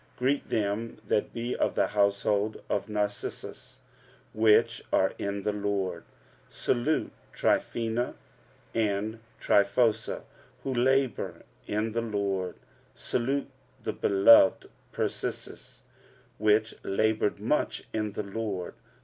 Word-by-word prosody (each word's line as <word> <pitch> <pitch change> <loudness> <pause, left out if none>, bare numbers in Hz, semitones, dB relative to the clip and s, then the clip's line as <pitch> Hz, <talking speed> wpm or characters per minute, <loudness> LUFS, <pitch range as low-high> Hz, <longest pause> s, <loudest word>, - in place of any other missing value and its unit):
Greet 135 +3 0
them 110 +1 -1
that 105 - +1
be 120 +1 -3
of - - 0
the - - +3
household 100 +1 +1
of 105 - -1
Narcissus, 105 -1 -4 0.5
which 110 -1 +4
are - - +3
in 100 0 -3
the 105 - 0
Lord. 100 -4 -2 0.4
45:016:012 - - -26
Salute 130 +6 +1 0.2
Tryphena 115 +1 0 0.6
and 110 0 0 0.2
Tryphosa, 110 +2 +2 0.4
who 135 - -2
labour 130 0 +1 0.2
in 105 +2 -1
the 115 +1 -1
Lord. 100 -4 -2 0.4
Salute 135 +4 -1 0.3
the - - -2
beloved 100 0 +5 0.2
Persis, - - -4 0.6
which 110 +1 +3
laboured 110 +1 +1
much 115 +8 0
in 110 -2 -2
the 105 - -3
Lord. 100 -3 -4
105 Hz, 105 wpm, -28 LUFS, 100-115 Hz, 0.6 s, beloved